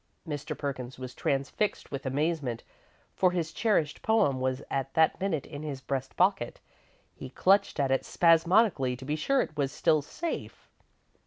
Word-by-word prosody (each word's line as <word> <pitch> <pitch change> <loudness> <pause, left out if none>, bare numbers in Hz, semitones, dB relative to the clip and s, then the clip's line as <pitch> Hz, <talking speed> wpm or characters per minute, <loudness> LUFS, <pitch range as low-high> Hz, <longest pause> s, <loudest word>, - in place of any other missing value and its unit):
Mr. 145 -2 -4
Perkins 130 -3 -5
was 130 -1 -7
transfixed 140 +9 -1
with 140 -1 -4
amazement, 140 -3 -1 0.5
for 185 - +3
his 170 -3 -2
cherished 160 -10 +1
poem 145 -12 +2
was 130 0 -1
at 135 0 -2
that 160 +2 +3
minute 170 -8 -1
in 145 -1 -8
his 145 -3 -5
breast 135 0 -4
pocket. 180 -10 +1 0.5
He - - -9
clutched 190 +4 +2
at 135 -2 +1
it 135 - +2
spasmodically, 170 - +3
to 130 - -10
be 150 +2 -1
sure 270 - +2
it 155 - -5
was 140 -2 0
still 155 -1 +2
safe. 330 - -6
145 Hz, 160 wpm, -29 LUFS, 135-170 Hz, 0.5 s, for